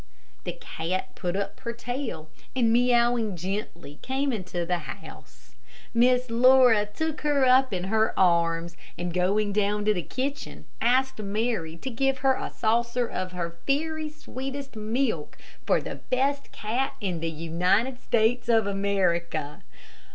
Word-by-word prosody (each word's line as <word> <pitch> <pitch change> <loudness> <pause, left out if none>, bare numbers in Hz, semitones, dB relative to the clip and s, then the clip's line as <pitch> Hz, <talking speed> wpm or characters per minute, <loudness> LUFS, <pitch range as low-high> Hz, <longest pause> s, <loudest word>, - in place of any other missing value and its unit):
The - - -2
cat 185 +4 -4
put 180 0 -3
up 200 0 -3
her 235 - -4
tail, 235 - -5 0.2
and, 230 -3 +3
meowing 240 -3 +3
gently, 175 -4 -5
came 270 +1 -1
into 180 -4 -3
the 175 0 0
house. - - -11 0.4
Miss 250 +1 +3
Laura 245 -3 +6
took 315 +8 -3
her 290 -3 +3
up 260 0 +5
in 180 -2 -2
her 220 +3 +1
arms, 170 -2 +2 0.2
and 175 0 -3
going 200 +3 +1
down 205 0 +1
to 215 - +4
the 180 - -2
kitchen, 275 - -4 0.2
asked 255 +2 +2
Mary 205 -5 -2
to 260 +9 -5
give 270 +3 +1
her 265 - +6
a - - -4
saucer 235 +2 0
of 185 -4 -4
her 170 -1 -4
very 310 +2 0
sweetest 275 -2 -7
milk 220 - -1 0.3
for - - +4
the - - -6
best 275 +2 0
cat 240 +6 -2
in 185 -5 -2
the 165 +1 -2
United 180 +10 0
States 235 +1 +1
of 225 -3 +4
America. 190 -6 0
220 Hz, 145 wpm, -26 LUFS, 180-255 Hz, 0.4 s, Laura